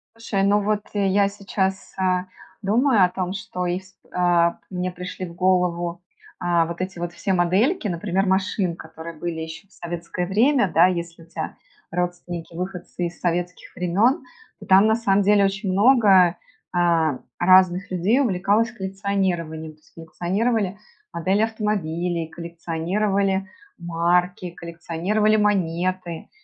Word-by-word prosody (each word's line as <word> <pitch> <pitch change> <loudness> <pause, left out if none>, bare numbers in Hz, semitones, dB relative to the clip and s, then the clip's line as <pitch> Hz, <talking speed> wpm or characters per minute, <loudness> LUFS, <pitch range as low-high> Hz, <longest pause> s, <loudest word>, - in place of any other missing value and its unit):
Слушай, 220 -4 -1
ну 205 +1 +3
вот, 210 0 0
э, 200 -2 +1
я 200 +1 +3
сейчас, 195 -1 -3
э, 185 -1 +1 0.4
думаю 220 +1 +3
о 180 - -1
том, 185 0 -3
что 195 -3 -4
и 175 +1 -1
c 190 0 -19 0.2
э, 175 -1 +3 0.2
мне 180 -1 -3
пришли 180 +1 -6
в 170 - -11
голову, 175 -2 +1 0.4
э, - - -3 0.2
вот 170 +1 -6
эти 185 -1 -4
вот 175 0 -4
все 190 +2 -1
модельки, 205 - +2
например, 185 +2 -1
машин, 190 -2 0
которые 160 0 -9
были 160 +1 -4
еще 160 +4 -8
в 200 - -36
советское 175 +1 -4
время, 220 - +3
да, 170 +3 +6
если 170 -2 -4
у - - -17
тя 165 - -5 0.4
родственники 175 -1 -4
выходцы 180 -1 -4
из 170 - -11
советских 175 +1 -3
времен. 200 - +2 0.4
И - - -11
там, 195 +3 +6
на 220 - +4
самом 205 -3 +2
деле, 200 0 +4
очень 195 0 -1
много, 195 -5 +5 0.4
э, 165 -5 +2 0.2
разных 185 +1 +4
людей 185 +8 +2
увлекалось 215 -1 +2
коллекционированием. 190 -6 -2
То - - -25
есть - - -27
коллекционировали 190 +5 -1 0.4
модели 190 +5 +1
автомобилей, 180 -7 -1
коллекционировали 190 +4 -1 0.3
марки, 175 +1 0
коллекционировали 175 +6 -1
монеты, 185 -3 -1
185 Hz, 140 wpm, -23 LUFS, 170-200 Hz, 0.4 s, да